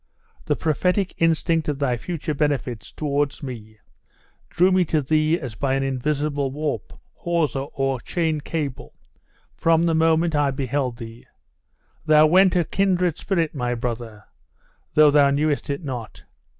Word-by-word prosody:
The - - +1
prophetic 180 +5 0
instinct 165 -1 +1
of 150 -2 -1
thy 135 -3 0
future 155 +4 -4
benefits 135 -6 -2
towards 145 +1 -2
me 110 -5 -8 0.7
drew 180 +2 +3
me 185 0 +4
to 155 0 +1
thee 155 +3 +1
as 130 -6 -6
by 135 +3 -1
an 135 - 0
invisible 140 +1 -1
warp, 140 -6 -4 0.2
hawser, 155 -5 -1
or 135 -1 0
chain 160 +1 -1
cable, 145 -4 -5 0.6
from 165 0 +2
the 170 -1 +2
moment 160 +1 +2
I 145 -1 +2
beheld 135 -2 -2
thee. 115 -1 -10 0.8
Thou 155 0 +6
went 185 +4 +4
a 175 - +3
kindred 180 -2 0
spirit, 170 -5 -1
my 125 -4 -2
brother, 115 -3 -5 0.7
though 150 -1 +7
thou 145 -1 +5
knewest 145 +1 0
it 140 +4 -3
not. 125 -6 -7
145 Hz, 145 wpm, -23 LUFS, 135-165 Hz, 0.8 s, though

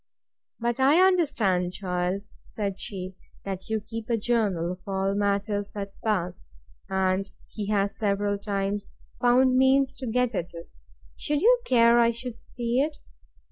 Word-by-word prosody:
But 240 +1 -1
I 280 +6 +5
understand, 245 - +2
child, 185 0 -2 0.2
said 200 -3 -4
she, 185 -2 -5 0.3
that 190 0 -5
you 220 0 0
keep 225 +2 -7
a 230 - +2
journal 205 -7 0
of 185 0 -8
all 195 0 0
matters 205 0 -1
that 200 -1 -5
pass, 180 - -2 0.4
and 190 0 0 0.2
he 210 -2 -6
has 200 -1 +1
several 205 -1 0
times 200 0 -3 0.3
found 255 +1 +4
means 265 +1 +4
to 260 - -4
get 250 +1 +1
at 175 -3 -4
it: 170 - -10 0.5
Should 295 -1 -1
you 485 +2 +5
care 235 -1 +5
I 235 0 +5
should 235 0 -6
see 240 +1 -2
it? 295 +2 0
205 Hz, 150 wpm, -26 LUFS, 195-240 Hz, 0.5 s, I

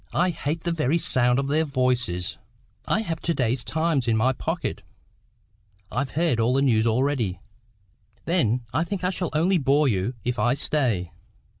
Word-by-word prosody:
I 180 +1 +3
hate 155 0 -3
the 170 - 0
very 155 -1 +1
sound 125 -6 +2
of 135 0 0
their 155 +3 +2
voices." 125 - -1 0.5
"I 215 - +2
have 165 -7 -3
got - - -26
to 170 - +2
day's 125 0 0
Times 160 -5 0
in 115 -1 +2
my 130 +4 +2
pocket." 165 +6 -3 1.1
"I've 130 +4 -1
heard 160 -8 +2
all 120 +3 +2
the 135 - +3
news 115 -4 +3
already." 115 - 0 0.9
"Then 125 - +1
I 165 - +2
think 185 +1 -4
I 180 - +1
shall 180 -2 -2
only 175 +4 +2
bore 145 +1 +3
you 110 +2 0
if 125 +1 -1
I 120 +1 +2
stay." 120 - 0
135 Hz, 175 wpm, -24 LUFS, 120-160 Hz, 1.1 s, I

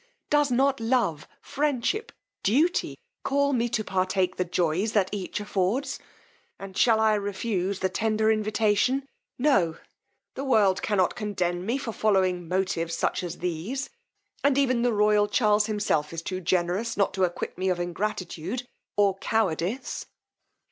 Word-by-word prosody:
Does 295 -1 +4
not 270 +2 +2
love, 225 - 0
friendship, 295 - -1 0.3
duty 300 - +1 0.2
call 280 0 +1
me 240 -1 +1
to 220 -1 -1
partake 185 -1 0
the 180 - +2
joys 175 +4 0
that 195 -3 +2
each 200 -2 -3
affords! 210 +7 -1 0.6
And 195 -1 -9
shall 225 0 +4
I 220 -1 +4
refuse 200 -2 -2
the 190 - +3
tender 220 +1 +1
invitation! 215 +5 +1 0.3
No! 195 - +2 0.6
the 270 - -5
world 210 -8 +3
cannot 190 -4 +1
condemn 185 -5 -2
me 240 +4 +1
for 250 -4 -4
following 185 -5 +1
motives 175 -2 -1
such - - 0
as 175 -1 -5
these; 180 - -3 0.5
and 280 -1 +3
even 255 -4 +2
the 245 0 +2
royal 210 -1 +3
Charles 210 0 +3
himself 205 -8 0
is 165 0 -5
too 185 +1 -4
generous 180 +5 0
not 200 - +2
to 190 - 0
acquit 175 -1 -2
me 185 +1 -1
of 180 -1 0
ingratitude 195 +4 -3 0.3
or 200 -2 +3
cowardice. 205 +1 -1
205 Hz, 145 wpm, -26 LUFS, 185-235 Hz, 0.6 s, Does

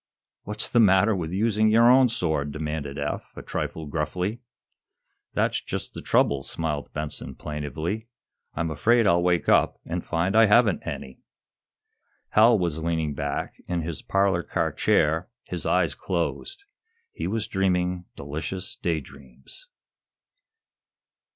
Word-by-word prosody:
"What's 105 - -1
the 120 - +2
matter 100 0 +5
with 85 -3 -3
using 110 +2 +2
your 115 +2 +6
own 130 0 +6
sword?" 80 -9 -1
demanded 75 -2 -4
Eph, 75 +1 -4
a - - -7
trifle 80 - -4
gruffly. 90 +9 -2 0.9
"That's - - +1
just - - -5
the - - -7
trouble," 70 -1 +2
smiled 75 0 -4
Benson, 75 0 -4
plaintively. 80 +8 -4 0.5
"I'm 85 -1 -1
afraid 115 +9 +3
I'll 85 -3 +4
wake 85 -2 +1
up - - +3
and 85 +1 -3
find 85 +5 -1
I 115 0 +7
haven't 105 -2 +3
any." 65 -1 -6 1.1
Hal 115 +2 +6
was 85 -4 -1
leaning 80 -2 -1
back 70 0 -3
in 85 -2 -1
his 80 -2 -5
parlor 95 -2 +1
car - - -1
chair, 80 +4 +2
his - - -4
eyes - - +2
closed. 390 - -3 0.5
He - - -4
was 110 -1 -2
dreaming 90 -3 0
delicious 80 +6 -5
daydreams. 70 - -6
85 Hz, 130 wpm, -25 LUFS, 75-105 Hz, 1.1 s, I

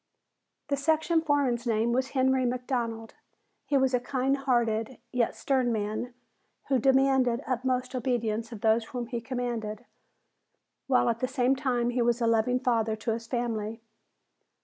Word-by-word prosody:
The 280 - +1
section 320 +3 +2
foreman's 275 -6 +1
name 225 +1 +1
was 260 +1 0
Henry 260 0 +3
McDonald. 240 -3 -2 0.5
He 285 - +2
was 265 -1 +2
a 250 - +3
kind 260 +2 0
hearted, 240 -3 0 0.2
yet 245 -2 +1
stern 260 -3 +1
man 215 +3 -3 0.5
who 265 -2 +3
demanded 265 -1 +3
utmost 255 0 -1
obedience 230 -3 -1
of 220 -3 -8
those 225 0 +3
whom 245 +1 -5
he 235 0 -4
commanded, 240 -2 -4 1.0
while 255 -3 +3
at 230 -1 0
the 255 - 0
same 260 0 +2
time 245 -3 0
he 245 0 0
was 240 0 +2
a 235 - +1
loving 230 +2 +2
father 225 -4 +1
to 225 +2 -3
his 230 +1 -4
family. 225 -3 -2
245 Hz, 150 wpm, -28 LUFS, 230-260 Hz, 1.0 s, Henry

